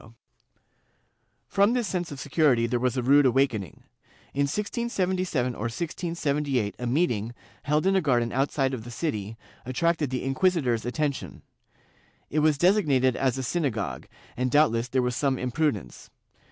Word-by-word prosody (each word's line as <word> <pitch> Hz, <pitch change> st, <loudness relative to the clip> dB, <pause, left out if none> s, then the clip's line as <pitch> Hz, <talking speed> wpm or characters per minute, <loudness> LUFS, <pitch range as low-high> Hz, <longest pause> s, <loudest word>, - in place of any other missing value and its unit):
"^ 110 Hz, -, -16 dB, 1.3 s
From 200 Hz, +4 st, +3 dB
this 245 Hz, -3 st, 0 dB
sense 175 Hz, -4 st, -3 dB
of 140 Hz, -, -7 dB
security 140 Hz, -4 st, +2 dB
there 120 Hz, +1 st, 0 dB
was 125 Hz, +1 st, 0 dB
a 125 Hz, -, 0 dB
rude 140 Hz, +2 st, +5 dB
awakening. 120 Hz, -7 st, 0 dB, 0.5 s
In 140 Hz, +1 st, +1 dB
1677 185 Hz, -, -1 dB
or 115 Hz, 0 st, -3 dB
1678 145 Hz, -, -2 dB
a 125 Hz, -, -3 dB
meeting, 120 Hz, -5 st, 0 dB, 0.3 s
held 150 Hz, +3 st, 0 dB
in 195 Hz, 0 st, +3 dB
a 190 Hz, -, +3 dB
garden 120 Hz, -6 st, +1 dB
outside 135 Hz, 0 st, 0 dB
of 120 Hz, -4 st, -4 dB
the 120 Hz, -, -9 dB
city, 115 Hz, -5 st, -3 dB, 0.3 s
attracted 150 Hz, +3 st, 0 dB
the 130 Hz, -1 st, -3 dB
inquisitor's 135 Hz, -5 st, +1 dB
attention. 145 Hz, +2 st, -3 dB, 0.9 s
It 155 Hz, -, +1 dB
was 155 Hz, -1 st, +3 dB
designated 145 Hz, -, +3 dB
as 130 Hz, -1 st, 0 dB
a -, -, -2 dB
syna 145 Hz, +2 st, 0 dB
gogue, 105 Hz, -3 st, -4 dB, 0.3 s
and 125 Hz, +1 st, 0 dB
doubtless 125 Hz, -5 st, +3 dB
there 130 Hz, +1 st, 0 dB
was 125 Hz, 0 st, -1 dB
some 135 Hz, 0 st, +1 dB
imprudence. 125 Hz, -, -2 dB
135 Hz, 155 wpm, -26 LUFS, 120-160 Hz, 1.3 s, rude